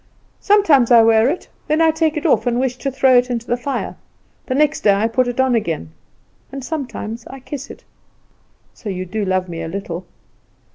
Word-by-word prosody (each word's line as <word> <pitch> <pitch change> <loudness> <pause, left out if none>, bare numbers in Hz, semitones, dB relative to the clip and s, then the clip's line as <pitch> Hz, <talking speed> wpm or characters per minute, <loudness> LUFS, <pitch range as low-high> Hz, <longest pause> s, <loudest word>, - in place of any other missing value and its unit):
"Sometimes 325 - +4
I 235 -2 +7
wear 225 +2 +4
it; 340 - -4 0.2
then 305 0 +1
I 325 -1 +5
take 315 -1 0
it 300 - -4
off 290 - +2
and 240 0 +1
wish 255 -1 0
to 275 - -2
throw 265 -1 +4
it 250 +1 -3
into 235 -1 -3
the 240 - 0
fire; 270 +3 -4 0.5
the 255 - -1
next 300 +1 +2
day 200 -1 +4
I 210 +3 +1
put 250 +2 +1
it 245 +1 -4
on 260 -1 +3
again, 165 - -2 0.6
and 270 -1 -7
sometimes 245 -7 -5
I 270 - -9
kiss 280 +1 -7
it." - - -12 0.9
"So 215 - -8
you 185 -1 -4
do 210 +4 -3
love 185 -1 0
me 165 -1 -6
a - - -4
little?" 180 0 -6
245 Hz, 205 wpm, -19 LUFS, 215-280 Hz, 0.9 s, I